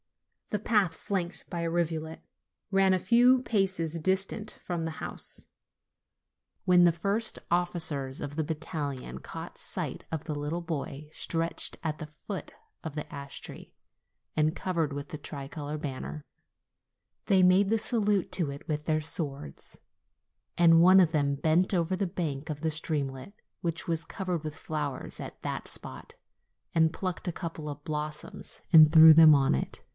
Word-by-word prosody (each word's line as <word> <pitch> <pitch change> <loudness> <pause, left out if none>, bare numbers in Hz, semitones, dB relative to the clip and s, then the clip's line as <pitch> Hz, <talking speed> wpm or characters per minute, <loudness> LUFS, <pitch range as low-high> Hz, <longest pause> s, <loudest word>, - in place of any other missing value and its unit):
The 210 - -1
path, 205 -6 +2
flanked 180 -3 -4
by 170 - -3
a 165 - -1
rivulet, 160 -1 -2 0.5
ran 195 -1 +4
a 185 - +2
few 245 +6 +5
paces 190 -8 0
distant 190 +5 -1
from 175 -2 -5
the 160 -1 -5
house. - - -3 1.2
When 180 -1 +6
the 175 - +6
first 200 +7 0
officers 160 -6 0
of 145 0 -5
the 160 - 0
battalion 145 - -4
caught - - -8
sight - - -4
of 160 -2 -3
the 155 - -3
little 145 +4 -3
body 150 -3 -5
stretched 165 0 -2
at 155 -2 -2
the 155 - -6
foot 150 0 -7 0.3
of 160 -2 -6
the 150 - -4
ash 140 -1 -6
tree - - -10 0.6
and 155 0 +2
covered 170 -5 -1
with 140 0 -6
the 155 - -5
tricolored 145 +1 -6
banner, 145 +2 -5 1.1
they 190 -3 +5
made 185 +2 +5
the 225 +1 +2
salute 210 -4 +2
to 170 -6 0
it 140 +1 -8
with 150 -1 -2
their 155 -1 +1
swords, 140 - -4 0.8
and 165 -1 +6
one 185 +2 +8
of 175 -4 +4
them 140 -2 +1
bent 160 +7 +2
over 175 0 +1
the 190 +1 -1
bank 155 -4 -4
of 150 -2 -4
the 160 +1 -1
streamlet, 150 0 -2 0.3
which 165 -1 -2
was 165 -1 0
covered 180 -3 -4
with 155 -1 -5
flowers 145 -3 -4
at - - -8
that - - -4
spot, - - -4 0.6
and 160 -1 +4
plucked 185 +2 -4
a - - +1
couple 165 -3 -6
of 145 0 -8
blossoms 150 -1 -5
and 155 -2 +9
threw 160 0 +10
them 160 -1 +9
on 135 - +3
it. 65 - -3
160 Hz, 160 wpm, -29 LUFS, 150-180 Hz, 1.2 s, threw